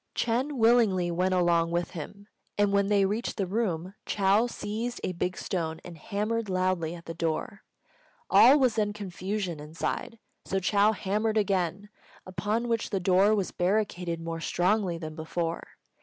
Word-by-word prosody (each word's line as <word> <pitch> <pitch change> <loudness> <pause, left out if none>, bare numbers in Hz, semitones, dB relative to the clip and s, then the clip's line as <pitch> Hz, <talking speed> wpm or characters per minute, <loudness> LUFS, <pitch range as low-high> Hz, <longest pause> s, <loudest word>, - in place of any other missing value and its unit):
Ch'êng 250 +6 0
willingly 225 -7 +3
went 185 +2 +1
along 170 -2 +3
with 170 0 -1
him; 200 +5 -8 0.3
and 205 -1 +2
when 200 0 +3
they 200 -1 +3
reached 210 +5 -2
the 195 - 0
room, 185 -3 -2
Chou 200 +4 +3
seized 235 +1 -4
a - - -1
big 180 +1 -3
stone 160 -4 -3
and 175 - -9
hammered 210 +6 -2
loudly 185 -3 0
at 170 - -12
the 165 - -5
door. 165 +5 -3 0.7
All 275 +3 +7
was 255 -5 +2
then 205 -1 +1
confusion 190 -3 -4
inside, 155 +9 -4 0.3
so 195 - -1
Chou 205 +3 +3
hammered 215 +2 -1
again, 195 -1 0 0.4
upon 205 +6 -2
which 230 -1 -1
the 195 - -1
door 190 +3 +4
was 195 -3 -1
barricaded 180 -3 -1
more 165 0 -5
strongly 180 +1 +1
than 155 -2 -6
before. 165 +1 -3
190 Hz, 155 wpm, -28 LUFS, 175-210 Hz, 0.7 s, All